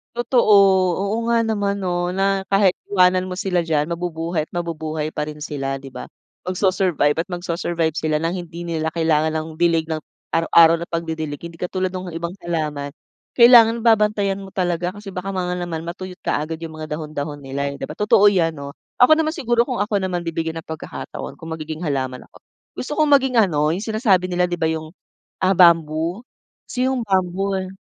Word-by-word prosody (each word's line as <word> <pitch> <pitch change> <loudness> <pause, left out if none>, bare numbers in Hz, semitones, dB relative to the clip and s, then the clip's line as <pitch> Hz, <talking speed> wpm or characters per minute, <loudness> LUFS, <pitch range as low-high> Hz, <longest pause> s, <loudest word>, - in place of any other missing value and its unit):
Totoo, 240 -2 +3 0.5
oo 200 +2 -1
nga 235 -1 +3
naman 205 -2 -1
'no 175 0 -1
na 195 0 +1
kahit 195 -1 +3
iwanan 185 -1 +3
mo 185 - -5
sila 180 -1 0
diyan, 155 -1 0
mabubuhay 165 -2 -2
at - - -47
mabubuhay 160 -3 -3
pa 150 - -3
rin 150 0 -8
sila, 135 -3 -3
'di 135 0 -10
ba. 125 - -8 0.4
Mag-su-survive 185 -5 +1
at 165 - -1
mag-su-survive 175 -2 -2
sila 155 -1 0
ng 165 +1 -1
hindi 170 +1 -8
nila 165 -2 -2
kailangan 160 -1 +1
ng 155 0 -2
dilig 170 -2 +3
ng 160 -1 -2 0.3
araw-araw 165 0 +5
na 170 - -6
pagdidilig. 160 -3 -4
Hindi 170 -1 -9
katulad 185 +1 -2
nung 185 0 -6
ibang 170 +1 -4
halaman, 150 -4 -3 0.5
kailangan 235 -2 +7
babantayan 210 -3 +2
mo 195 - -9
talaga 180 -1 -2
kasi 205 -1 -9
baka 185 +1 -4
ma 185 -1 -1
nga - - -1
naman 165 -2 -4
matuyot 180 +2 -7
kaagad 155 +2 -1
yung 160 -1 -6
mga 155 -1 -5
dahon-dahon 150 -2 -5
nila, 140 +1 -3
eh, 140 - -6
'di - - -5
ba. - - -8
Totoo 210 -1 +4
yan 165 -4 +1
'no. 140 -1 -7 0.3
Ako 250 +5 +7
naman 310 0 +2
siguro, 240 -7 +1
kung 245 0 -2
ako 205 -1 0
naman 180 -2 -2
bibigyan 165 0 -3
ng 160 - -8
pagkakataon, 160 -1 -7
kung 160 0 -7
magiging 160 +1 -6
halaman 130 -3 -3
ako, - - -19 0.4
gusto 255 - -6
kong 305 -2 +4
maging 265 -2 +3
ano, 155 -9 +3
yung 165 - 0
sinasabi 215 -5 +2
nila 180 -1 0
di 175 - -2
ba, 165 - 0
yung, 160 -1 -2 0.5
ah, 190 0 +2
bamboo. 165 +1 +4 0.5
Kasi 250 - -1
yung 260 - -1
bamboo 190 +1 0
eh, 185 0 -4
175 Hz, 190 wpm, -21 LUFS, 160-195 Hz, 0.5 s, kailangan